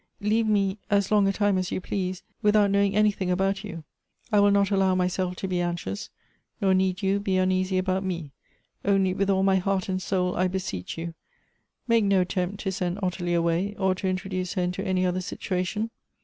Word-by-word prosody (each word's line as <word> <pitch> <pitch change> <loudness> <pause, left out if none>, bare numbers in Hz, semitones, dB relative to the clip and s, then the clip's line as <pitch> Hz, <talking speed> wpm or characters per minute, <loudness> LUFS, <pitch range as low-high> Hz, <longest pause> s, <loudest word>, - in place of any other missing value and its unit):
— - - -47
Leave 225 0 +2
me, 200 -1 +1
as 200 -1 +2
long 205 -2 +4
a - - +3
time 205 -1 +1
as 185 - -3
you - - -1
please, 185 -1 -3 0.2
without 210 -1 +4
knowing 200 0 +2
anything 205 -3 +2
about 195 +2 0
you. 165 - -7 0.5
I 210 - +4
will 205 0 +5
not 200 0 +3
allow 190 -1 +3
myself 180 0 0
to 190 - -4
be 180 -1 0
anx 175 0 -2
ious 95 +1 -5 0.3
— - - -47
nor 190 -1 +3
need 185 +1 +1
you 195 +1 +2
be 195 -2 0
uneasy 185 0 +1
about 185 +1 0
me; 170 -6 -4 0.5
only, 195 -2 +2
with 195 +1 0
all 190 -1 +3
my 195 0 +4
heart 190 0 -1
and 185 0 -1
soul, 180 -2 0
I 185 +1 +2
beseech 180 - -4
you, 165 0 -5 0.7
make 230 -2 +4
no 200 -2 +3
attempt 180 +1 -2
to 190 - -1
send 180 -1 -2
Ottilie 175 -1 -1
away, 170 +4 0
or 190 -1 +2
to 190 +1 -3
introduce 185 -1 -2
her 180 - 0
into 180 +2 -2
any 185 -2 +1
other 180 0 0
situ 185 +2 -5
ation. 210 +5 -1
190 Hz, 215 wpm, -26 LUFS, 180-200 Hz, 0.7 s, will